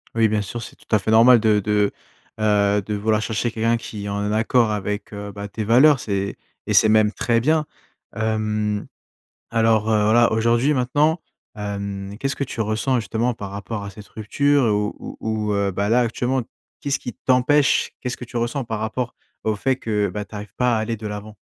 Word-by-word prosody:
Oui, 115 -1 +4
bien 105 0 0
sûr, 115 +4 -6
c'est - - -9
tout - - -11
à 105 - +5
fait 105 - -4
normal 115 +2 +7
de 105 -2 +3
de, 105 0 +1 0.5
heu, 105 -1 +2
de 105 +2 -5
vouloir 105 +1 +1
chercher 110 +2 -1
quelqu'un 115 +1 +1
qui 105 -3 -7
est - - -4
en 100 +1 -2
accord 115 +1 +2
avec, 105 0 -3
heu, 100 0 -6
bah, 100 0 -7
tes 110 +2 -5
valeurs, 130 +6 +5
c'est 100 -1 -2 0.3
et - - 0
c'est 110 - +6
même 110 0 +4
très 115 -1 +1
bien. 155 +4 +2 0.5
Hem, 105 -1 -1 0.6
alors, 110 -1 +2
heu, 105 -1 +3
voilà, 115 +2 +4
aujourd'hui, 115 +6 +2
maintenant, 145 +6 +1 0.3
hem, 100 -1 -5
qu'est-ce 135 0 -1
que 140 - -1
tu 125 -3 -6
ressens 110 +4 0
justement 115 +4 -1
par 100 -4 -7
rapport 100 +2 -5
à - - -6
cette 105 +1 -13
rupture? 140 +5 +1
Ou 105 -1 0
ou - - -8
ou, 110 -1 -1
heu, 100 -1 +1
bah, 100 +2 -1
là, 120 +3 +4
actuellement, 125 +2 0 0.4
qu'est-ce 140 -1 0
qui 125 - -7
t'empêche 130 +2 +2
qu'est-ce 125 -1 -3
que 125 - -8
tu 120 - -9
ressens 120 +3 -1
par 110 -2 -4
rapport 120 +3 -3 0.3
au 110 -1 0
fait 130 +4 0
que, 105 -5 -1
bah, 105 +2 -5
tu 110 - -14
arrives 105 0 -8
pas 125 -2 +2
à - - +1
aller 115 0 -3
de 110 - -6
l'avant? 105 +1 -7
110 Hz, 205 wpm, -22 LUFS, 105-120 Hz, 0.6 s, normal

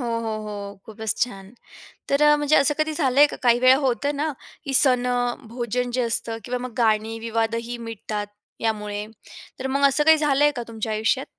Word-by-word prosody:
हो, - - -3 0.2
हो, 225 -1 -3
हो, 200 -1 -7
खूपच 220 0 -4
छान! 195 -4 -4 0.6
तर 295 +1 +5
म्हणजे 295 +1 +2
असं 280 +2 +4
कधी 310 0 0
झालंय 280 -2 +4
का, - - -7
काही 240 0 +4
वेळा 255 +1 +6
होतं 285 +3 0
ना, 300 +2 -1 0.3
की 275 - -3
सणं, 245 -1 +1
भोजन 245 +1 -3
जे 255 - +1
असतं 230 -1 -1
किंवा 250 +1 -3
मग 240 - -14
गाणी, 225 -1 +1
विवादही 230 +1 -2
मिटतात 210 -1 -5 0.3
यामुळे. 210 -2 -2 0.5
तर 265 - -3
मग 280 +1 +3
असं 285 +2 +1
काही 320 +1 +6
झालंय 295 -1 +3
का - - -3
तुमच्या 220 -1 -4
आयुष्यात? 220 +5 0
245 Hz, 180 wpm, -23 LUFS, 220-275 Hz, 0.6 s, वेळा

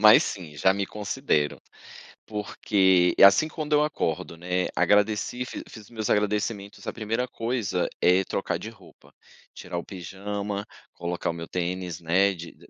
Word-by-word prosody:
mas 105 0 +8
sim. 80 -6 -6
Já 95 +5 +4
me 100 0 -2
considero, 105 - -1 0.7
porque 95 -3 +2
assim 100 +10 +8
quando 155 -1 -4
eu 150 - +5
acordo, 85 - -2
né? 90 +1 -1
Agradeci, 105 +6 +2
fiz - - -7
fiz 110 - -11
os 105 - -18
meus 110 -3 -4
agradecimentos. 105 0 -1
A - - -2
primeira 115 +2 -2
coisa 115 -7 -1
é 90 +2 +5
trocar 95 -2 -2
de 100 +6 -7
roupa, 100 -5 -18 0.4
tirar 90 -1 -6
o 85 - -3
pijama, 100 +2 -5 0.3
colocar 85 0 -3
o - - -1
meu 85 0 -7
tênis, 90 -1 -3
né, 95 +4 +3
de 85 -2 -9
100 Hz, 155 wpm, -26 LUFS, 90-110 Hz, 0.7 s, mas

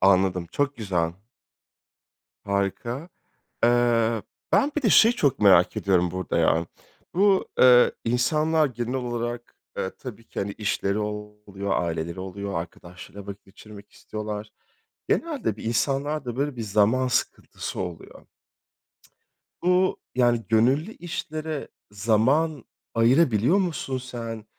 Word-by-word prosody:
Anladım, 95 -2 +3
çok 145 -1 -1
güzel. 90 -7 -1 1.3
Harika. 100 - -2 0.6
Eee, 115 -2 +3 0.3
ben 290 +1 +3
bir 305 - 0
de 225 - +2
şeyi 225 +3 +6
çok 140 - +1
merak 95 -4 +5
ediyorum 90 -3 +2
burada 95 0 -2
ya. 80 +1 +2 0.5
Bu, 195 +1 +3
eee, 125 -1 +7
insanlar 150 +7 +2
genel 120 0 -4
olarak, 120 -1 -4 0.2
eee, 95 - -1
tabii 115 -3 -9
ki, - - -6
hani, 100 +1 -2
işleri 100 0 -1
oluyor, 105 -1 -5
aileleri 85 +1 -3
oluyor, 100 +1 -5
arkadaşlarıyla 90 +3 -12
vakit 100 0 -8
geçirmek 105 +1 -14
istiyorlar. 105 0 -6 0.6
Genelde 285 - -1
bir - - -10
insanlarda 135 +2 -1
böyle 140 -1 -1
bir 115 - -4
zaman 110 +5 +2
sıkıntısı 125 - -3
oluyor. 90 -3 -7 1.4
Bu, 180 +1 +2 0.2
yani, 120 -2 +2
gönüllü 130 - +2
işlere 155 -4 -5 0.2
zaman 120 +8 +1 0.3
ayırabiliyor 120 - +4
musun 160 -8 -2
sen? 115 -3 -7
115 Hz, 115 wpm, -25 LUFS, 100-135 Hz, 1.4 s, eee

